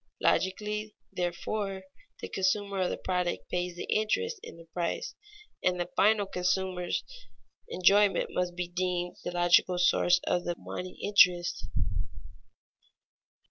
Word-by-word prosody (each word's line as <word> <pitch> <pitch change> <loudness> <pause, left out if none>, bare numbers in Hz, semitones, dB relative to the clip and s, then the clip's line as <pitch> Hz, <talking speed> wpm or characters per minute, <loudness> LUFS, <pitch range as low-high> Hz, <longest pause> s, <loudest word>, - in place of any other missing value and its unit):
Logically, 210 +2 0 0.2
therefore, 190 +2 -3 0.4
the - - -4
consumer 195 +1 0
of 180 - +1
the - - -3
product 180 -1 -2
pays 180 0 -2
the - - -5
interest 445 - 0
in - - -10
the 165 - -13
price, 170 +1 -3 0.5
and 180 0 +1
the 175 - -3
final 210 0 +4
consumer's 180 -1 -1 0.7
enjoyment 200 +3 +3
must 180 -1 -1
be 180 0 -3
deemed 180 0 -2
the - - -3
logical 175 +1 +3
source 180 0 +4
of 175 - 0
the 175 - -2
money 180 0 -7
interest. 180 -4 +4
180 Hz, 125 wpm, -29 LUFS, 175-200 Hz, 0.7 s, final